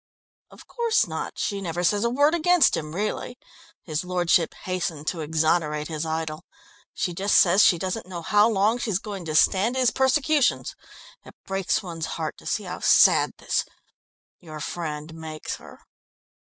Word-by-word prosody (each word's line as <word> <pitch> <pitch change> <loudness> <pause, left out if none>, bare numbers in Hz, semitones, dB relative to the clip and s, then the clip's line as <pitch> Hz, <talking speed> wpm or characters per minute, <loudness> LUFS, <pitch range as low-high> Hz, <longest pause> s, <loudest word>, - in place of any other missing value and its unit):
"Of - - -16
course 465 -1 +1
not. - - -6
She 200 -2 -2
never 175 -1 -3
says 205 +4 +2
a 235 - +2
word 285 +5 +3
against 345 -3 +4
him 155 0 -5
really." 215 +4 -3 0.5
His 155 -1 -3
lordship 175 -2 +1
hastened 175 -5 -3
to 175 - -5
exonerate 155 0 0
his 160 0 -3
idol. 160 -1 -3 0.5
"She 180 - -3
just 195 +4 +2
says 185 +3 +5
she 175 - +5
doesn't 185 +4 -4
know 175 -2 -7
how 210 +5 +4
long 215 +3 +1
she's 215 -6 -1
going 195 -3 -7
to 155 -1 -4
stand 200 +9 +3
his 255 -3 +3
persecutions. 270 +2 +1 0.5
It - - -15
breaks 195 +2 -1
one's 165 -3 -5
heart - - -3
to - - -12
see - - -1
how - - -6
sad - - +5
this - - -1 0.8
your 155 -3 -10
friend 155 0 -5
makes 160 -1 -6
her." - - -15
180 Hz, 165 wpm, -24 LUFS, 160-220 Hz, 0.8 s, says